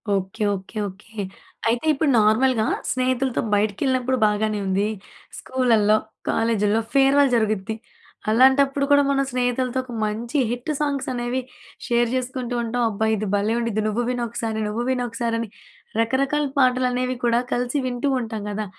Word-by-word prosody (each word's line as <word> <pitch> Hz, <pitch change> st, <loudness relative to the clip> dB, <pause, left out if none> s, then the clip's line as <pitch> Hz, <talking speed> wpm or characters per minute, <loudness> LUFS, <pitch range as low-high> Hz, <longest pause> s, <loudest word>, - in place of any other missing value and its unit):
Okay, 195 Hz, +3 st, -3 dB
okay, 190 Hz, +3 st, -9 dB
okay. 210 Hz, +3 st, -9 dB, 0.5 s
అయితే 235 Hz, +5 st, 0 dB
ఇప్పుడు 300 Hz, +1 st, +1 dB
నార్మల్‍గా 220 Hz, +2 st, +3 dB, 0.3 s
స్నేహితులతో 255 Hz, 0 st, 0 dB
బయటికేళ్ళినప్పుడు 255 Hz, +5 st, +1 dB
బాగానే 210 Hz, 0 st, 0 dB
ఉంది. 195 Hz, +2 st, +1 dB, 0.5 s
స్కూల్‌లల్లో, 225 Hz, -5 st, +2 dB, 0.3 s
కాలేజీల్లో 225 Hz, -1 st, +1 dB
ఫేర్‌వెల్ 275 Hz, 0 st, +4 dB
జరుగుద్ది. 215 Hz, -1 st, 0 dB, 0.5 s
అలాంటప్పుడు 270 Hz, +4 st, +4 dB
కూడా, 285 Hz, 0 st, +6 dB
మనం 275 Hz, 0 st, +2 dB
స్నేహితులతో 250 Hz, 0 st, 0 dB
ఒక 255 Hz, -, -11 dB
మంచి 230 Hz, +6 st, -3 dB
హిట్టు 245 Hz, +5 st, -3 dB
సాంగ్స్ 280 Hz, -3 st, -1 dB
అనేవి 245 Hz, +1 st, -2 dB, 0.5 s
షేర్ 240 Hz, -1 st, +2 dB
చేసుకుంటూ 255 Hz, -1 st, -3 dB
ఉంటాం. 240 Hz, +1 st, -1 dB
అబ్బా! 215 Hz, +1 st, -1 dB
ఇది 215 Hz, 0 st, -3 dB
భలే! 205 Hz, +2 st, +1 dB
ఉండిద్ది 225 Hz, -2 st, -1 dB
నువ్వు 220 Hz, +3 st, 0 dB
విను 245 Hz, -1 st, -1 dB
ఒకసారి, 225 Hz, -1 st, -3 dB
నువ్వు 210 Hz, +3 st, -2 dB
విను 255 Hz, -1 st, 0 dB
ఒకసారి, 230 Hz, 0 st, -2 dB
అని 230 Hz, -2 st, -4 dB, 0.5 s
రకరకాల 270 Hz, +6 st, +1 dB
పాటలు 255 Hz, -1 st, +3 dB
అనేవి 250 Hz, +1 st, -1 dB
కూడా 235 Hz, 0 st, +3 dB
కలిసి 245 Hz, +3 st, -1 dB
వింటూ 245 Hz, +2 st, -2 dB
ఉంటాం 225 Hz, -3 st, -4 dB
కదా! 210 Hz, +1 st, -3 dB
240 Hz, 145 wpm, -23 LUFS, 220-255 Hz, 0.5 s, కూడా